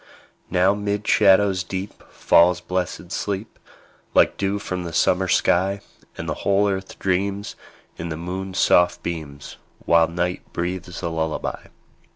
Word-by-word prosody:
Now 95 Hz, +2 st, +3 dB
'mid 105 Hz, 0 st, -3 dB
shadows 100 Hz, -2 st, +4 dB
deep 95 Hz, +2 st, -6 dB
Falls 90 Hz, +1 st, +4 dB
blessed 90 Hz, 0 st, -4 dB
sleep, 100 Hz, +2 st, -4 dB, 0.6 s
Like -, -, +5 dB
dew 100 Hz, 0 st, -1 dB
from 90 Hz, -3 st, -4 dB
the 85 Hz, -1 st, -6 dB
summer -, -, +2 dB
sky; 95 Hz, +3 st, +2 dB, 0.4 s
And -, -, -5 dB
the -, -, -1 dB
whole 100 Hz, +1 st, +2 dB
earth 95 Hz, -1 st, -4 dB
dreams, 100 Hz, +2 st, -1 dB, 0.4 s
In 85 Hz, -, -5 dB
the 80 Hz, -, -4 dB
moon's 95 Hz, +3 st, -5 dB
soft 90 Hz, 0 st, +3 dB
beams, 75 Hz, -4 st, -6 dB, 0.3 s
While 85 Hz, -1 st, +5 dB
night 90 Hz, +2 st, -2 dB
breathes 90 Hz, +1 st, -4 dB
a 85 Hz, -, -1 dB
lullaby. 80 Hz, -1 st, -3 dB
90 Hz, 140 wpm, -22 LUFS, 85-100 Hz, 0.6 s, Like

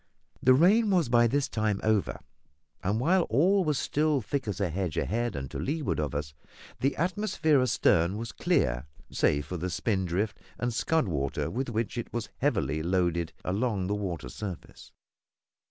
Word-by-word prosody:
The 130 Hz, 0 st, +6 dB
rain 205 Hz, -, +5 dB
was 175 Hz, -9 st, +2 dB
by 120 Hz, -1 st, +5 dB
this 140 Hz, +3 st, +1 dB
time 110 Hz, -2 st, -1 dB
over, 110 Hz, -2 st, +1 dB, 0.6 s
and 100 Hz, +4 st, 0 dB
while 175 Hz, +8 st, +3 dB
all 185 Hz, -, +3 dB
was 150 Hz, -4 st, 0 dB
still 150 Hz, +1 st, +1 dB
thick 130 Hz, +3 st, -3 dB
as 100 Hz, -4 st, -3 dB
a 95 Hz, -5 st, 0 dB
hedge 90 Hz, -2 st, -2 dB
ahead 120 Hz, +5 st, -1 dB
and 65 Hz, -1 st, -5 dB
to -, -, -5 dB
leeward 150 Hz, -, -1 dB
of 75 Hz, -3 st, -2 dB
us, 70 Hz, 0 st, -3 dB, 0.5 s
the 135 Hz, +1 st, +1 dB
atmosphere 175 Hz, -5 st, +1 dB
astern 95 Hz, -6 st, +2 dB
was 115 Hz, +1 st, -5 dB
clear, 60 Hz, +2 st, 0 dB, 0.2 s
save 75 Hz, 0 st, +1 dB
for 90 Hz, -, -5 dB
the 90 Hz, +3 st, -3 dB
spindrift 95 Hz, +1 st, -1 dB, 0.2 s
and 120 Hz, -1 st, -2 dB
scud 160 Hz, +4 st, +1 dB
water 70 Hz, -5 st, -2 dB
with 130 Hz, +1 st, -2 dB
which 115 Hz, +1 st, -2 dB
it -, -, -6 dB
was 115 Hz, -3 st, -4 dB
heavily 80 Hz, -, 0 dB
loaded 85 Hz, -1 st, 0 dB
along 100 Hz, 0 st, 0 dB
the 100 Hz, -, -1 dB
water 90 Hz, -10 st, -4 dB
surface. 95 Hz, -, -8 dB
110 Hz, 170 wpm, -28 LUFS, 90-140 Hz, 0.6 s, The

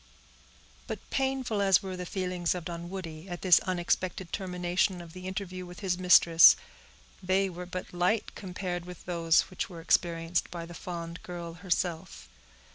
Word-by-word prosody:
But -, -, -6 dB
painful 265 Hz, -5 st, 0 dB
as 195 Hz, 0 st, +4 dB
were 190 Hz, -1 st, -4 dB
the 180 Hz, -1 st, -6 dB
feelings 180 Hz, -2 st, -1 dB
of 175 Hz, -2 st, -5 dB
Dunwoodie 170 Hz, 0 st, -6 dB
at 175 Hz, -1 st, -6 dB
this 180 Hz, -4 st, +7 dB
unexpected 180 Hz, 0 st, -1 dB
termination 180 Hz, 0 st, 0 dB
of 170 Hz, -2 st, -11 dB
the 185 Hz, 0 st, -8 dB
interview 185 Hz, -1 st, -5 dB
with 180 Hz, +2 st, -10 dB
his 190 Hz, -3 st, 0 dB
mistress, 170 Hz, -2 st, +8 dB, 0.7 s
they 190 Hz, +1 st, +1 dB
were 180 Hz, +1 st, -7 dB
but 180 Hz, 0 st, -6 dB
light 180 Hz, +5 st, +1 dB
compared 180 Hz, -2 st, -5 dB
with 180 Hz, -1 st, -10 dB
those 165 Hz, -2 st, +3 dB
which 185 Hz, -, -3 dB
were 170 Hz, -3 st, -9 dB
experienced 165 Hz, 0 st, +1 dB
by 170 Hz, -1 st, -6 dB
the 175 Hz, -, -10 dB
fond 170 Hz, -1 st, -6 dB
girl 170 Hz, -2 st, -7 dB
herself. 175 Hz, -, -3 dB
180 Hz, 155 wpm, -29 LUFS, 170-185 Hz, 0.7 s, mistress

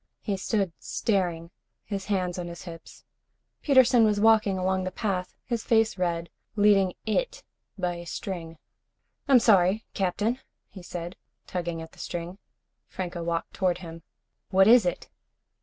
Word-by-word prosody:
He 205 Hz, -, -2 dB
stood 195 Hz, -2 st, -1 dB
staring, 175 Hz, -5 st, -1 dB, 0.3 s
his 195 Hz, -2 st, -4 dB
hands 185 Hz, -3 st, -1 dB
on 175 Hz, -, -4 dB
his 170 Hz, 0 st, -8 dB
hips. 165 Hz, -2 st, -11 dB, 0.6 s
Peterson 255 Hz, -4 st, +5 dB
was 210 Hz, -2 st, +3 dB
walking 215 Hz, -3 st, +4 dB
along 185 Hz, 0 st, 0 dB
the 185 Hz, -, -2 dB
path, 185 Hz, -1 st, -3 dB
his 235 Hz, -3 st, -2 dB
face 225 Hz, -1 st, +3 dB
red, 170 Hz, -2 st, -2 dB, 0.2 s
leading 200 Hz, -3 st, +4 dB
it -, -, -1 dB, 0.3 s
by 180 Hz, -2 st, -2 dB
a 170 Hz, -, -8 dB
string. 165 Hz, -1 st, -5 dB, 0.7 s
"I'm 270 Hz, -2 st, +7 dB
sorry, 205 Hz, -2 st, +4 dB
Captain," 205 Hz, +6 st, 0 dB, 0.3 s
he 190 Hz, -, -11 dB
said, 175 Hz, 0 st, -7 dB, 0.3 s
tugging 170 Hz, -2 st, -4 dB
at 160 Hz, -, -12 dB
the -, -, -19 dB
string. 175 Hz, +2 st, -5 dB, 0.5 s
Franco 175 Hz, -2 st, -5 dB
walked 170 Hz, 0 st, -3 dB
toward 180 Hz, -3 st, +1 dB
him. 165 Hz, -2 st, -9 dB, 0.5 s
"What 190 Hz, +1 st, +5 dB
is 230 Hz, -4 st, +7 dB
it?" 175 Hz, -, -3 dB
185 Hz, 145 wpm, -27 LUFS, 175-210 Hz, 0.7 s, I'm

